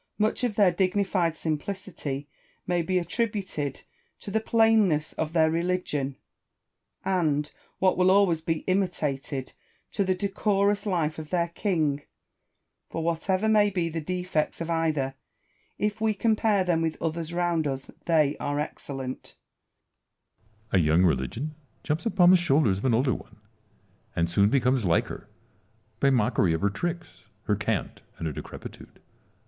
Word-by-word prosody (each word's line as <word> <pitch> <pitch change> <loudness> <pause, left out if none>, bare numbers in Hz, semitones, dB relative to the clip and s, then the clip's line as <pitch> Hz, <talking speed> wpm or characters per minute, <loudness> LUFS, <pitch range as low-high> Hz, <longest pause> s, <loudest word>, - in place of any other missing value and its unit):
Much 215 +3 +1
of 235 -4 0
their 200 -4 +5
dignified 185 -2 +1
simplicity 155 -3 -4 0.4
may 175 -1 +1
be 185 +3 0
attributed 190 - -2 0.4
to 200 - -8
the 220 - +2
plain 225 -1 +4
ness 150 -3 -1
of 160 -1 -2
their 160 -1 +3
religion, 165 -5 -1 0.9
and, 155 -6 +1 0.3
what 185 -1 +3
will 180 0 +5
always 190 -4 +4
be 160 0 -1
imitated, 150 -8 -2 0.4
to 200 - 0
the 185 -1 +1
decorous 200 +1 +1
life 160 -5 0
of 155 -1 -8
their 170 -2 0
king: 160 -6 0 0.9
for 165 - -3
whatever 185 +5 0
may 210 -1 +5
be 175 -4 -1
the 165 0 -3
defects 180 -2 -2
of 170 0 -3
either, 155 -5 0 0.6
if 210 +1 -1
we 220 -1 +2
compare 215 -2 +2
them 175 -3 +1
with 160 -1 -2
others 165 0 -3
round 170 -3 0
us, 135 -1 -4 0.2
they 155 -4 +3
are 145 0 -1
excellent, 135 -3 -6 1.4
Salomon. 90 -5 +3
A - - +2
young 85 +4 +5
religion 115 - -1 0.3
jumps 155 +9 -1
upon 180 -5 +5
the - - +8
shoulders 145 - +3
of - - -5
an 120 -3 +3
older 130 +1 +2
one, - - -10 0.8
and 85 -1 +1
soon 100 +4 +3
becomes 130 -1 +2
like 85 -3 +2
her, - - -9 0.7
by 140 - +4
mockery 110 -8 +2
of 80 - -2
her 100 - +2
tricks, 170 - -5 0.2
her - - +1
cant, - - -2 0.2
and - - -5
her 80 - -2
decrepitude. - - -10
165 Hz, 150 wpm, -27 LUFS, 145-190 Hz, 1.4 s, the